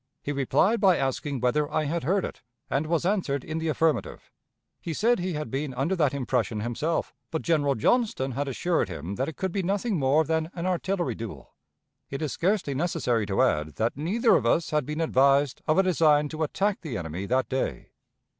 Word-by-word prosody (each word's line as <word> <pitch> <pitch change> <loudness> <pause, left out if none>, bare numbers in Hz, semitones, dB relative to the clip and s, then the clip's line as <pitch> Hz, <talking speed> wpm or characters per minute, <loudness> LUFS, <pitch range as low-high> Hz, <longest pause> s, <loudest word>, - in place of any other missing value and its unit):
He 145 - -2
replied 145 - +2
by 190 -4 +5
asking 135 0 -2
whether 145 +4 +1
I - - +1
had 165 +3 -2
heard 190 +7 +1
it, - - -8 0.3
and 145 +3 0
was 170 +1 0
answered 175 -9 0
in 160 0 -4
the 160 - -2
affirmative; 160 0 -1 0.5
he 165 - -4
said 235 +6 +2
he 180 0 -2
had 150 -6 -4
been 135 -1 -3
under 140 +9 0
that 150 -6 +2
impression 125 -5 -1
himself, 135 +9 -2 0.2
but 160 - -3
General 145 -5 +2
Johnston 135 - +1
had 140 +3 -2
assured 160 - 0
him 85 +2 -5
that 130 +8 -2
it 160 - -10
could 190 -1 -2
be 195 - -1
nothing 200 +1 0
more 140 +4 +3
than 160 0 -1
an 170 0 -4
artillery 185 0 -1
duel. 95 - -8 0.6
It 135 +3 -4
is 150 - -2
scarcely 185 -5 0
necessary 125 - 0
to 100 +6 +2
add 75 -11 0
that 115 +1 0
neither 205 - +2
of - - +2
us 165 - +1
had 150 -4 0
been 150 +2 -3
advised 140 -2 +3
of 155 - +3
a 190 - +5
design 150 -5 +3
to 155 +1 -6
attack 195 +6 0
the 140 -9 -4
enemy 85 +3 -5
that 130 +3 +1
day. 130 - -3
150 Hz, 200 wpm, -26 LUFS, 130-170 Hz, 0.6 s, by